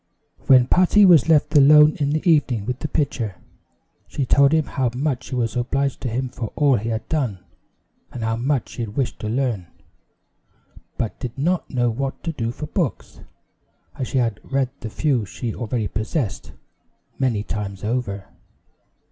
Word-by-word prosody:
When 130 -2 +7
Patty 185 +8 +5
was 165 -5 +6
left 150 -1 +3
alone 150 +2 +7
in 145 -1 +1
the 155 +5 -1
evening 135 -10 +2
with 125 +2 -3
the 155 - -3
pitcher, 125 - -2 0.7
she 135 - -2
told 140 +2 +4
him 160 -2 +2
how 130 -3 -1
much 130 -2 -2
she - - -5
was 115 -3 -1
obliged 135 +3 -1
to 125 - -2
him 130 +3 -2
for 120 -3 -6
all 145 -4 +3
he 110 +3 -3
had 110 0 -3
done, 120 - -2 0.7
and 120 - -6
how 110 0 0
much 130 +1 -1
she 120 - -4
wished 120 +5 -3
to 105 - -4
learn; 115 -7 -1 1.3
but 115 - -3
did 120 0 -6
not 175 +6 0
know 120 -2 +1
what 135 +4 -4
to 165 - -2
do 115 -7 -3
for 150 - -6
books, 160 - -3 0.7
as 130 - -4
she - - -2
had 115 -4 0
read 135 -2 -1
the 110 - -6
few 130 0 0
she 105 +4 -5
already 115 -2 -2
possessed, 110 - -3 0.7
many 120 -6 0
times 100 -3 -5
over. 105 -4 -2
125 Hz, 170 wpm, -22 LUFS, 115-145 Hz, 1.3 s, When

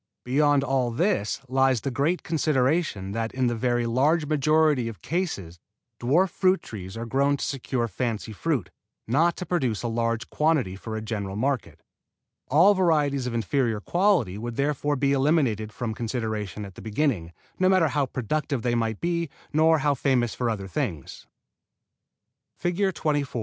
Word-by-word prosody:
Beyond 145 +2 +3
all 130 -3 +1
this 135 - 0
lies 130 -2 +2
the 135 - -2
great 150 +8 0
consideration 145 - 0
that 115 +2 -2
in 130 -1 +1
the 120 -1 +1
very 120 +1 0
large 145 +7 +2
majority 150 -3 +2
of 115 -3 -8
cases 120 - -3 0.4
dwarf 165 +10 +2
fruit 185 0 +2
trees 95 -1 -8
are 115 - -4
grown 140 +4 +1
to - - -3
secure 130 -3 -2
fancy 110 0 -3
fruit, 115 - -2 0.4
not 160 +9 +2
to 180 - -5
produce 130 - -1
a - - -1
large 115 +1 -1
quantity 150 - +1
for 110 +3 -6
a 110 - -5
general 100 -3 -4
market. 130 +2 -2 0.6
All 170 +9 +6
varieties 150 -8 +1
of 120 - -3
inferior 115 -1 0
quality 175 - +1
would 120 +1 -5
therefore 145 +1 0
be 140 0 +1
eliminated 135 -7 +1
from 110 +2 -4
consideration 110 -3 -3
at 100 - -10
the - - -11
beginning, 110 - -1 0.3
no 185 0 +4
matter 185 -5 +4
how 140 -1 0
productive 135 +1 -2
they 120 - +1
might 115 -2 -1
be, 170 -2 -1 0.2
nor 160 +1 +5
how 145 0 +2
famous 125 -4 +1
for 120 -2 -1
other 100 -4 -3
things. 95 - -4 1.4
[Illustration: 175 -5 +1
FIG. 125 - -5
130 Hz, 160 wpm, -25 LUFS, 115-150 Hz, 1.4 s, All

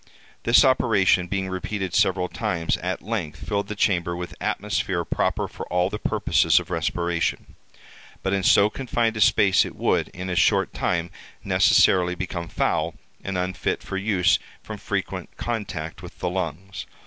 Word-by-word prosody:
This 120 +5 +6
operation 105 -8 +3
being 95 +1 -2
repeated 95 0 -4
several 95 -1 +2
times, 85 -2 -1
at 90 +2 -4
length 100 -8 -4
filled 100 -1 -1
the 105 - -5
chamber 85 -4 +1
with 90 0 -6
atmosphere 95 -5 -1
proper - - -1
for - - -8
all 90 +2 0
the 105 - -4
purposes - - +3
of - - -9
respiration. 85 -1 -1 0.7
But 95 - 0
in 100 - +1
so 100 +2 +5
confined 120 -3 -1
a 110 - -2
space 100 -3 +5
it - - -7
would, - - +1
in 90 +1 -7
a 90 - -2
short 85 - +2
time, 85 -1 -1 0.3
necessarily 90 -1 +4
become 85 -1 -4
foul, - - -1 0.3
and 95 -1 -3
unfit 90 +1 -2
for - - -6
use 95 -3 +2 0.2
from - - -7
frequent - - -4
contact 95 -8 -4
with 90 - -11
the 90 - -2
lungs. 95 +1 -4
95 Hz, 160 wpm, -24 LUFS, 90-100 Hz, 0.7 s, This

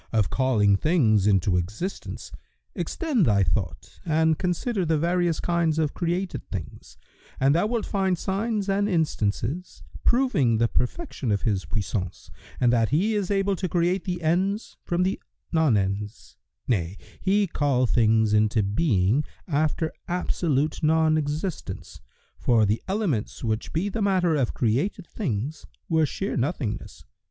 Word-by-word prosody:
of 110 -5 +1
calling 110 -7 +3
things 110 - +3
into 95 -2 +3
existence, 105 - -5 0.4
extend 300 - 0
thy 100 -3 +4
thought 85 -2 -3
and 160 -1 +2
consider 185 +4 -1
the 160 -2 +1
various 170 0 +1
kinds 170 -2 +1
of 155 -3 0
created 175 +2 -2
things, - - -7 0.4
and 135 +2 +4
thou 175 +6 +2
wilt 230 -1 -1
find 190 -2 0
signs 205 +3 -1
and 200 +1 +1
instances, 155 - -1 0.2
proving 235 - +3
the 115 +1 +3
perfection 130 - -2
of 100 - 0
His 100 -6 0
puissance 95 +2 -4 0.3
and 120 -1 +3
that 115 -2 +2
He 190 +10 +2
is 205 -3 -1
able 195 -1 +1
to 185 0 -2
create 175 +2 +1
the 175 -2 -3
ens 190 +7 0
from 175 +1 0
the 190 +1 -1 0.3
non 160 -9 +3
ens; 100 +2 -3 0.3
nay, 95 -5 0 0.2
He 200 +2 +3
called 140 -7 +1
things 110 -2 +3
into 105 0 +3
being, 105 - +2 0.2
after 155 0 0
absolute 160 -4 0
non 160 0 +3
existence, 150 - -4 0.4
for 115 -3 +3
the 105 +3 0
elements 190 - -2
which 110 -1 -2
be 170 +5 -1
the 215 +2 -3
matter 185 -4 +2
of 135 -5 0
created 140 - 0
things 150 - -4 0.2
were 160 -2 +2
sheer 195 +8 -3
nothingness. 130 - -3
155 Hz, 145 wpm, -25 LUFS, 110-180 Hz, 0.4 s, thy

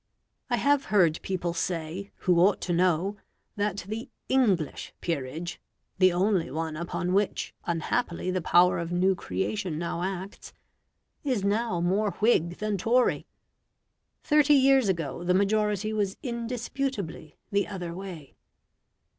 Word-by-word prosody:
I - - +2
have 285 -1 +2
heard 175 -6 +3
people 180 -2 -2
say, 170 +3 -3
who 180 -3 +4
ought 190 +3 +4
to 175 - -1
know, 185 +3 +1 0.4
that 205 -2 -2
the 220 +3 -5 0.2
ENGLISH 200 - +1
peerage 165 +2 -4 0.4
(the 185 -1 +6
only 185 0 +1
one 160 0 -3
upon 175 +2 -2
which 200 +1 0
unhappily 170 +2 -1
the 185 0 -1
power 175 +2 +4
of 170 0 -4
new 185 +2 +3
creation 170 - -3
now 170 +1 -3
acts) 190 +1 -5 0.7
is 255 -9 0
now 205 -2 0
more 195 +3 +1
Whig 175 -6 +2
than 210 -2 -2
Tory. 245 +5 +2 1.0
Thirty 295 0 +5
years 265 -4 +5
ago 170 -3 -2
the 180 +1 +2
majority 210 +1 +1
was 200 -2 -1
indisputably 235 - -4
the 200 0 +1
other 180 -4 -5
way. 175 -6 -8
190 Hz, 130 wpm, -27 LUFS, 170-215 Hz, 1.0 s, the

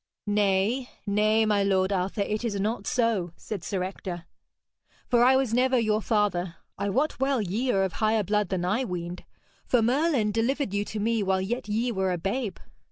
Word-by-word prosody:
'Nay, 205 +4 +1 0.2
nay, 215 +2 +3
my 210 -2 +2
lord 190 0 +2
Arthur, 195 +2 -1
it 215 +3 -3
is 210 -4 -2
not 210 0 -2
so,' 220 -8 0
said 200 -5 -6
Sir 190 -2 -2
Ector, 180 -2 -6 0.8
'for 240 -1 +4
I 260 +2 +6
was 260 -4 +1
never 255 +2 +3
your 215 -2 +1
father. 190 -6 0 0.2
I 200 - -2
wot 270 +9 0
well 270 -1 +1
ye 220 +6 -1
are 195 -3 +2
of 190 -3 -2
higher 215 +3 +1
blood 210 0 0
than 180 -2 -1
I 210 +8 +1
weened. 175 -4 -5 0.4
For 245 -3 +3
Merlin 255 -3 +2
delivered 230 +1 0
you 205 0 +1
to 215 - -5
me 225 +1 +1
while 190 -1 +1
yet 215 +4 -3
ye 230 +4 0
were 190 -3 0
a 180 - -1
babe.' 200 +3 -2
210 Hz, 190 wpm, -27 LUFS, 190-235 Hz, 0.8 s, I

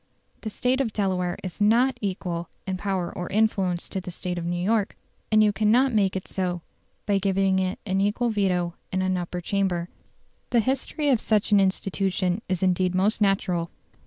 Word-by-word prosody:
The 220 - -4
State 255 +5 0
of 230 -5 -2
Delaware 185 -3 0
is 185 +2 -7
NOT 240 +4 +3
equal 180 -4 -3 0.2
in 190 -1 -2
power 190 -2 -2
or 180 - -4
influence 195 -4 +1
to 190 - -3
the 185 - -7
State 180 0 -4
of 170 - -5
New 175 0 -1
York, 205 +2 0 0.3
and 215 0 +6
you 210 -1 +3
cannot 235 +5 +3
make 195 -3 +2
it 190 - -4
so 180 -2 -2 0.4
by 200 -2 +2
giving 195 -1 +2
it 185 0 -1
an 190 -1 0
equal 225 +4 +1
veto 180 -5 0 0.2
in 185 0 0
an 185 0 +1
Upper 180 0 -3
Chamber. 180 -2 -1 0.6
The 240 - +3
history 270 +5 0
of 250 -5 +3
such 215 -1 +1
an 205 - +6
institution 190 0 0
is 185 -1 -1
indeed 185 0 +2
most 205 +4 +1
natural. 185 -4 +1
195 Hz, 185 wpm, -25 LUFS, 180-210 Hz, 0.6 s, and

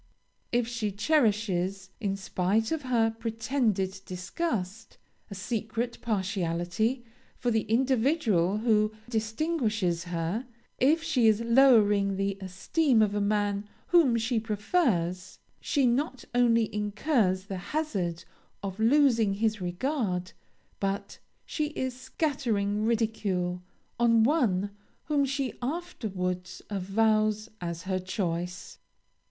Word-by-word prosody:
If 240 -1 +1
she 230 -3 -2
cherishes, 200 - +1
in 200 -4 -1
spite 195 +3 0
of 320 -2 -1
her 235 -4 +2
pretended 225 -4 -1
disgust, 195 - -4 0.3
a 200 - -7
secret 225 +3 -3
partiality 195 +3 -1 0.3
for 245 - 0
the 220 -1 0
individual 235 - +2
who 215 -1 +2 0.2
distinguishes 220 - -1
her, 175 +8 -2 0.3
if 310 +5 +3
she 275 -9 +3
is 220 0 +4
lowering 220 -5 +5
the 195 0 -1
esteem 220 - +2
of 205 -1 0
a 205 - 0
man 205 0 0 0.2
whom 310 -9 +5
she 225 +1 0
prefers, 205 - 0 0.2
she 280 -3 +1
not 255 +1 0
only 230 -3 +3
incurs 210 -2 +1
the 195 -1 -5
hazard 195 - -2 0.4
of 195 +1 -5
losing 230 -4 +4
his 215 -1 0
regard, 185 - -2 0.5
but 200 0 -3 0.3
she 305 -1 -2
is 260 -1 -2
scattering 235 -7 -1
ridicule 205 -6 0 0.4
on 230 -1 +5
one 220 - +2 0.3
whom 290 -3 +1
she 275 -1 -2
afterwards 210 - -4
avows 215 +2 +1
as 170 -1 -4
her 185 0 -1
choice. 180 -1 -4
215 Hz, 110 wpm, -28 LUFS, 195-245 Hz, 0.5 s, lowering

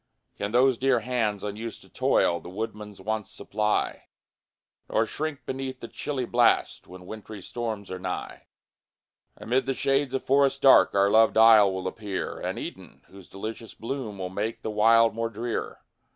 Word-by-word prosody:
Can 100 0 -3
those 125 +1 +3
dear 130 -3 +2
hands, 110 -4 -1
unused 105 +2 -6
to - - -19
toil, 85 0 +2
The - - -11
woodman's 105 0 -6
wants 110 +2 -3
supply, 105 0 -2 0.8
Nor 110 - +2
shrink 150 +4 -5
beneath 130 -1 -4
the 115 - -7
chilly 130 +1 -4
blast 120 0 +2
When 90 0 -12
wintry 110 +1 -9
storms 110 -5 -5
are 95 - -5
nigh? 90 0 -6 0.9
Amid 125 +4 -1
the 135 - 0
shades 135 0 +1
of 135 - -2
forests 140 0 +3
dark, 135 -5 +6
Our 100 0 +4
loved 110 +1 +5
isle 110 -3 +7
will 95 0 -4
appear 100 0 -4
An - - -3
Eden, - - -9
whose 95 -2 -15
delicious 110 +3 -7
bloom 115 -3 -5
Will 95 -1 -4
make 105 +4 -4
the 110 - -3
wild 115 +2 +5
more 115 +1 -2
drear. 115 +2 -4
110 Hz, 165 wpm, -26 LUFS, 100-125 Hz, 0.9 s, isle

